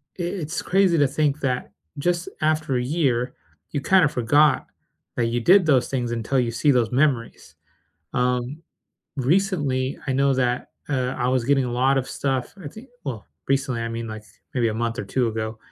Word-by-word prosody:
it 175 - -4 0.2
it's 160 +3 -3
crazy 190 -2 +3
to 145 -2 +4
think 150 +1 0
that 125 -5 -2 0.3
just 175 +3 0
after 155 -3 +1
a 125 - -1
year, 130 -4 0 0.4
you 145 - -2
kind 190 +1 +4
of 145 - 0
forgot 145 +6 +3 0.5
that 120 -1 +1
you 120 +1 0
did 185 +6 +6
those 130 -5 +3
things 120 -3 -2
until 120 +3 0
you 120 -2 0
see 140 +5 +2
those 120 -3 +2
memories, 130 -3 0 0.6
um, 125 +4 -1 0.6
recently, 140 -3 0
I 130 - 0
know 140 +1 +3
that, 125 -1 -1 0.2
uh, 130 -3 0
I 120 - +1
was 130 -2 +1
getting 135 0 +3
a 120 - -3
lot 130 +2 +2
of 130 - -3
stuff, 130 -3 -2
I - - -4
think 220 - -13 0.2
well, 125 -7 -5 0.2
recently, 135 -3 0
I 115 - -2
mean, 115 0 -5
like 110 -1 -7 0.3
maybe 120 -3 +2
a 110 - -2
month 115 +1 -2
or - - -2
2 125 -3 0
ago, 110 0 -4
130 Hz, 190 wpm, -23 LUFS, 120-145 Hz, 0.6 s, did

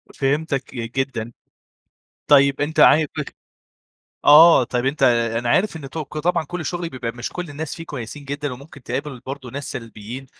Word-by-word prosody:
فهمتك 140 0 -1
جدًا. 120 -1 -3 1.0
طيب 140 -1 +5
أنت 150 +2 0
عاي 155 0 +6
بخ - - -1 1.0
آه، 155 0 +8
طب 125 +1 -2
أنت 135 0 0 0.3
أنا 120 0 -2
عارف 190 - +2
إن 140 -4 -9
توك 155 0 -6
طبعًا 170 +1 +1
كُلّ 175 +3 -5
الشغل 170 +2 -3
بيبقى 125 -4 -5
مش 120 0 -6
كُلّ 180 -2 -6
الناس 145 +1 -5
فيه 165 -1 -8
كويسين 140 +1 -7
جدًا، 145 -1 -4
وممكن 140 +1 -13
تقابل 135 +2 -4
برضو 135 -1 -7
ناس 140 +3 -6
سلبيين، 115 +2 -8
140 Hz, 160 wpm, -21 LUFS, 125-155 Hz, 1.0 s, آه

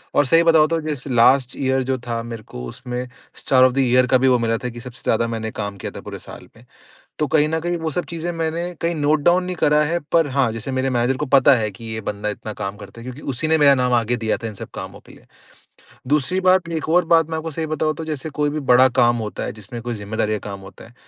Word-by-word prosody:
और 145 - +4
सही 165 +6 +4
बताऊँ, 160 -2 +5
तो 165 +1 0
जैसे 150 -3 -4
लास्ट 125 +1 +4
ईयर 130 -1 +1
जो 130 +1 -1
था, 115 -1 -2
मेरे 115 -2 -7
को 60 - -9
उसमें 125 - -6 0.3
स्टार 130 -1 +3
ऑफ 130 - +5
द - - -7
ईयर 125 -1 +4
का 130 - +4
भी 130 +1 +2
वो 125 -1 +5
मिला 115 -1 0
था 125 - -2
कि 120 0 -9
सबसे 125 0 -11
ज़्यादा 115 +1 +1
मैंने 110 -1 -4
काम 100 -2 -5
किया - - -6
था - - -7
पूरे - - -8
साल - - -11
में। - - -18 0.5
तो 150 - +1
कहीं 150 +1 +3
न 160 +1 0
कहीं 175 +1 -2
वो 160 -1 -3
सब 175 +4 -2
चीज़ें 170 +1 -3
मैंने 165 0 -2 0.2
कहीं 170 +1 0
नोट 150 0 +2
डाउन 175 +3 +4
नहीं 180 0 -4
करा 150 -2 +3
है, 165 +3 0
पर 165 -2 +4
हाँ, 130 -3 +1
जैसे 115 +4 -5
मेरे 130 +1 0
मैनेजर 125 +1 +1
को 150 - -2
पता 135 0 +5
है 110 -3 -1
कि 115 +4 -11
ये 110 - -4
बंदा 105 0 -3
इतना 105 +1 -6
काम 100 +1 -4
करता 100 +2 -12
है, - - -10
क्योंकि 130 +3 -8
उसी 125 +6 -2
ने 160 0 +3
मेरा 140 -2 +6
नाम 125 -1 +1
आगे 120 0 +2
दिया 110 -2 -1
था, 115 - -6
इन 110 - -6
सब - - -9
कामों - - -8
के - - -15
लिए। - - -19 0.8
दूसरी 150 +6 +1
बात, 185 -2 +3
एक 160 -2 -3
और 175 +2 +3
बात 165 -1 +2
मैं 160 - -2
आपको 160 +1 -5
सही 160 +2 -3
बताऊँ, 155 0 0
तो 165 - -6
जैसे 155 -1 -4
कोई 145 - +2
भी 150 +1 -3
बड़ा 130 +1 +6
काम 120 0 +4
होता - - -6
है, - - -3
जिसमें 110 +3 -9
कोई 120 +1 -4
ज़िम्मेदारी 105 +1 -2
का 105 - -8
काम 100 -1 -6
होता 95 0 -13
है, 115 - -17
130 Hz, 275 wpm, -21 LUFS, 115-155 Hz, 0.8 s, मेरा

